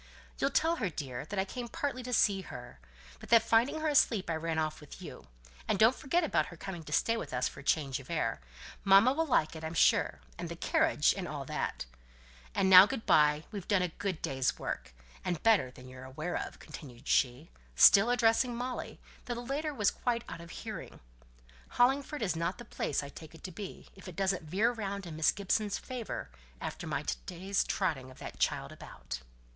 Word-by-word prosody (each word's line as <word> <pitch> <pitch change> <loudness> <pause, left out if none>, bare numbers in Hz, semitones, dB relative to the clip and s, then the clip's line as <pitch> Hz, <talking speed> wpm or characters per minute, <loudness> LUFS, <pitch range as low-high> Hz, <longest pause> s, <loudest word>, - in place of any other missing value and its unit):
"You'll 275 - +2
tell 325 +4 +2
her, 200 -9 -1
dear, 135 -5 -5
that 200 +6 -6
I 190 - +1
came 240 +4 -6
partly 265 +1 -3
to 250 0 -6
see 200 -4 +3
her 125 - -10 0.4
but - - -12
that 230 -1 +7
finding 245 +7 +2
her 315 - 0
asleep, 230 - +3
I - - 0
ran 160 0 -2
off 155 -1 -1
with 150 - -12
you, - - -10 0.4
and 210 - +1
don't 220 +5 +6
forget 340 +6 0
about 315 - +1
her 175 - -11
coming 180 -1 -6
to 150 - -9
stay 230 +9 +2
with - - -5
us 125 0 0
for - - -9
change 140 -1 0
of 130 - -13
air 115 - -1 0.4
mamma 200 +6 +6
will 325 +3 0
like 165 - +2
it, 160 - -8
I'm 160 +1 -4
sure - - +3 0.2
and - - -4
the - - -5
carriage, - - +2
and - - -4
all - - -5
that. - - -3 0.7
And 190 - +2
now 190 +1 +10
good 265 -2 -4
by, 150 0 +4
we've 200 -4 -6
done 200 -3 +3
a 180 - -1
good 185 0 -4
day's 130 -1 0
work! - - -5 0.3
And 175 -3 -2
better 220 - +4
than 125 0 -13
you're 130 0 -11
aware 155 +7 -5
of," - - -4
continued 125 -6 -11
she, 130 +4 +1 0.2
still 200 - +8
addressing 240 0 +3
Molly, 250 +1 -5 0.3
though 240 - -3
the 240 +1 -6
latter 295 +4 -2
was 215 -8 +2
quite 235 -1 -1
out - - -7
of 170 - -11
hearing. - - -7 0.8
"Hollingford 270 +2 +2
is 180 -5 0
not 170 +3 -2
the 240 - -10
place 145 - -2
I 140 - -7
take 160 +2 -12
it - - -16
to 185 - -6
be, 190 +2 -8
if 195 - -13
it 180 - -8
doesn't 190 -4 -1
veer 210 +8 +2
round 200 -4 -4
in 165 -3 -7
Miss 155 -1 +4
Gibson's 205 +1 -1
favour 250 -4 -6 0.3
after - - -5
my - - -2
to 60 - -2
day's 190 +3 -1
trotting 135 -9 -1
of 130 - -14
that - - -9
child - - 0
about." - - -8
190 Hz, 210 wpm, -31 LUFS, 155-235 Hz, 0.8 s, now